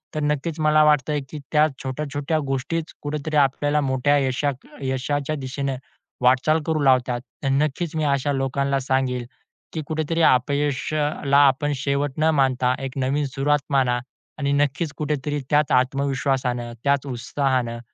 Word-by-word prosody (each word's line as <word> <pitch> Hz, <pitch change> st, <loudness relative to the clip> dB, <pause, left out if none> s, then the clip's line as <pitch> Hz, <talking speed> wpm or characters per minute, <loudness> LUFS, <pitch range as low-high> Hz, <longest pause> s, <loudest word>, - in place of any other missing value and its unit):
तर 155 Hz, -, -1 dB
नक्कीच 150 Hz, +2 st, -1 dB
मला 155 Hz, 0 st, +4 dB
वाटतंय 150 Hz, -1 st, +2 dB
की 155 Hz, -, -7 dB
त्या 150 Hz, 0 st, +5 dB, 0.2 s
छोट्या-छोट्या 145 Hz, +3 st, -2 dB
गोष्टीच 155 Hz, +5 st, -2 dB
कुठेतरी 150 Hz, +1 st, -3 dB
आपल्याला 145 Hz, +2 st, +2 dB
मोठ्या 135 Hz, +1 st, +2 dB
यशात 135 Hz, 0 st, -1 dB, 0.2 s
यशाच्या 140 Hz, +3 st, -1 dB
दिशेने 135 Hz, 0 st, -3 dB, 0.5 s
वाटचाल 130 Hz, +6 st, +3 dB
करू 160 Hz, -1 st, 0 dB
लावतात. 125 Hz, -2 st, +3 dB, 0.2 s
तर 135 Hz, -, +1 dB
नक्कीच 150 Hz, +4 st, 0 dB
मी 155 Hz, -, 0 dB
अशा 140 Hz, 0 st, +1 dB
लोकांना 135 Hz, +1 st, 0 dB
सांगेल 130 Hz, -2 st, -1 dB, 0.5 s
की 160 Hz, -, -2 dB
कुठेतरी 160 Hz, +1 st, -1 dB
अपयश 145 Hz, +1 st, +2 dB
अ, 150 Hz, -1 st, +1 dB
ला, 140 Hz, 0 st, +4 dB
आपण 145 Hz, +2 st, +1 dB
शेवट 140 Hz, +1 st, -1 dB
न 155 Hz, +1 st, +3 dB
मानता 130 Hz, -2 st, +2 dB
एक 135 Hz, +1 st, -5 dB
नवीन 135 Hz, +3 st, 0 dB
सुरुवात 140 Hz, +2 st, +1 dB
माना 125 Hz, -3 st, +2 dB, 0.4 s
आणि 140 Hz, -1 st, 0 dB
नक्कीच 145 Hz, +2 st, 0 dB
कुठेतरी 150 Hz, -1 st, -2 dB
त्याच 150 Hz, -1 st, +2 dB
आत्मविश्वासानं, 130 Hz, -2 st, 0 dB
त्याच 140 Hz, -1 st, +2 dB
उत्साहानं, 125 Hz, -1 st, -1 dB
140 Hz, 145 wpm, -23 LUFS, 130-150 Hz, 0.5 s, त्या